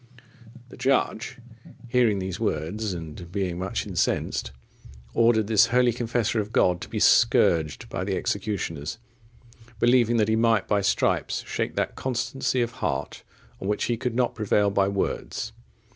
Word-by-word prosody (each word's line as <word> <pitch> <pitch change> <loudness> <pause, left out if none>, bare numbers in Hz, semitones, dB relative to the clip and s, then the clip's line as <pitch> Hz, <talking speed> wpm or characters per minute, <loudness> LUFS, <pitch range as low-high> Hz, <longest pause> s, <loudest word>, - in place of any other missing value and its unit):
The - - -13
judge, 130 -4 0 0.5
hearing 115 -4 +3
these 95 +1 -4
words, 105 +1 -2
and 85 0 -7
being 90 -3 -2
much 95 +1 -3
incensed, - - -1 0.6
ordered 115 -2 +3
this 105 -1 +4
holy 125 0 +3
confessor 115 -1 -1
of 105 0 -3
God 90 -4 +2
to - - -7
be - - -3
scourged 80 -3 +3
by 90 - -4
the 95 -1 -1
executioners, 95 -6 -3 0.8
believing 120 0 +3
that 105 -2 +3
he 110 - +2
might 115 -2 +2
by 105 -1 +2
stripes 100 - 0
shake - - -3
that - - -1
constancy 130 0 -1
of 120 - -3
heart, 70 +1 -2 0.4
on 95 - -4
which 105 - 0
he 120 - 0
could 120 0 -3
not 125 -1 +1
prevail 105 -1 +1
by 100 -1 +2
words. 100 0 -3
105 Hz, 150 wpm, -25 LUFS, 95-120 Hz, 0.8 s, this